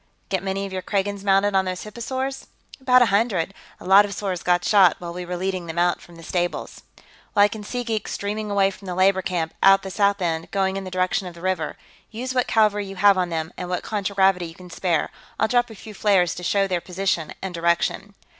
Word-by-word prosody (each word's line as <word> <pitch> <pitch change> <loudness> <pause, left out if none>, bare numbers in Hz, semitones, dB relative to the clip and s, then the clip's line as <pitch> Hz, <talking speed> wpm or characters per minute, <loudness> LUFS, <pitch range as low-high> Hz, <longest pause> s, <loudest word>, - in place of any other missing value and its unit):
Get 190 -2 0
many 195 +1 -2
of 195 - -7
your 185 - -3
Kragans 200 0 -2
mounted 200 +1 +3
on 190 0 +3
those 185 0 -4
hipposaurs?" 260 +5 -4 0.3
"About 255 -2 +5
a 215 -5 0
hundred, 200 -4 +1 0.3
a - - -12
lot 195 +2 +7
of 200 -1 -5
'saurs 190 -4 -3
got 175 0 +1
shot, 195 -5 +5
while 170 -1 -7
we 180 0 -6
were 180 0 -3
leading 185 -1 -3
them 160 +1 -6
out 175 0 +2
from 175 - -15
the 165 - -13
stables." 175 +1 -3 0.5
"Well, 205 - +7
I - - +4
can 210 0 -8
see 245 +4 -4
geeks 225 -3 -3
streaming 210 +1 -3
away 200 -1 +2
from 195 0 -13
the 180 - -3
labor 190 +1 +3
camp, 170 -4 -2
out 195 0 +6
the 190 - -6
south 200 +1 +2
end, 165 -2 -2
going 190 -1 0
in 195 0 -4
the - - -5
direction 185 +1 0
of 175 - -9
the 170 - -12
river. 185 0 -2 0.3
Use 250 +4 -5
what 250 -1 +1
cavalry 210 -2 +2
you 195 - -8
have 200 +1 +5
on 180 -1 0
them, 160 0 -3
and 180 - -5
what 180 - -2
contragravity 195 -3 +1
you 165 - -12
can 180 0 -13
spare. 170 -2 0 0.3
I'll 220 - +3
drop 245 +1 +2
a 220 - -10
few 215 +2 -11
flares 195 -5 +2
to - - -8
show 195 +3 +1
their 180 -3 -1
position 180 -3 -2
and 190 -1 -5
direction." 170 +4 0
195 Hz, 240 wpm, -23 LUFS, 180-205 Hz, 0.5 s, lot